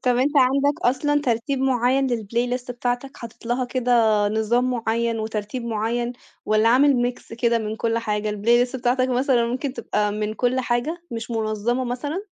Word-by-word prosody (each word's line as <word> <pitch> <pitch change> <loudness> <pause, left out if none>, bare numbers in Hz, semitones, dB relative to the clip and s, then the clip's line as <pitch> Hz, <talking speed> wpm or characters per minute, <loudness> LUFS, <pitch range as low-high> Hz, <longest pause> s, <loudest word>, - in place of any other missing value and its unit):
طَب 250 -1 +2
أنت 285 +4 +1
عندك 275 +2 +3
أصلًا 290 +4 +2
ترتيب 255 +2 -1
معيّن 265 +1 +2
للplaylist 245 +2 -2
بتاعتك، 245 +2 -3
حاطط 230 0 -11
لها 250 +1 0
كده 250 0 -1 0.4
نظام 230 +4 +1
معيّن 230 -1 -1
وترتيب 220 +2 -4
معيّن، 235 +2 -1 0.3
والّا 215 +1 +3
عامل 250 -1 +4
mix 225 - -13
كده 235 0 +1
من 215 0 -4
كُلّ 230 0 0
حاجة؟ 210 -2 -2
الplaylist 240 +5 +2
بتاعتك 255 +1 +1
مثلًا 250 -1 +2
ممكن 255 +3 -3
تبقى 210 -3 -1
من 210 +1 -3
كُلّ 250 +2 +1
حاجة، 255 +8 -2
مش 230 0 -5
منظمة 225 +3 -1
مثلًا؟ 290 +9 -3
240 Hz, 160 wpm, -23 LUFS, 225-255 Hz, 0.4 s, عامل